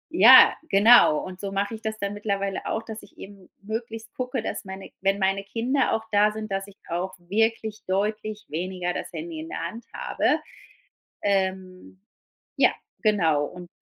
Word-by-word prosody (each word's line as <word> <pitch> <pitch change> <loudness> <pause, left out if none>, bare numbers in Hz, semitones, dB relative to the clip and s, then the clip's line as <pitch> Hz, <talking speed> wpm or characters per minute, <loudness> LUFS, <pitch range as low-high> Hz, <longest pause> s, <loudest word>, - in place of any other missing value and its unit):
ja, - - +9
genau. 200 -5 +7
Und 185 0 -9
so 200 -1 -4
mach 200 +2 -1
ich 220 0 -7
das 220 -1 -4
dann 200 0 -3
mittlerweile 200 -2 -2
auch, 220 - -2
dass 220 -1 -8
ich - - -18
eben 195 -2 -12
möglichst 225 +1 -6
gucke, 250 -2 -3
dass - - -4
meine 190 0 -9
wenn 195 +1 +2
meine 195 0 +1
Kinder 245 +6 0
auch 220 - -1
da 205 0 +4
sind, 215 -1 -7
dass 195 +1 -2
ich 200 - -15
auch 180 +2 -3
wirklich 220 +4 -1
deutlich 210 +2 -2
weniger 180 +2 -3
das - - -5
Handy 325 0 -6
in 320 +1 -7
der - - -5
Hand 230 +1 -10
habe. - - 0 0.8
Ähm, 190 -2 -2 0.6
ja, - - +5 0.3
genau 165 -9 +2
und 180 +2 -10
200 Hz, 170 wpm, -25 LUFS, 190-220 Hz, 0.8 s, ja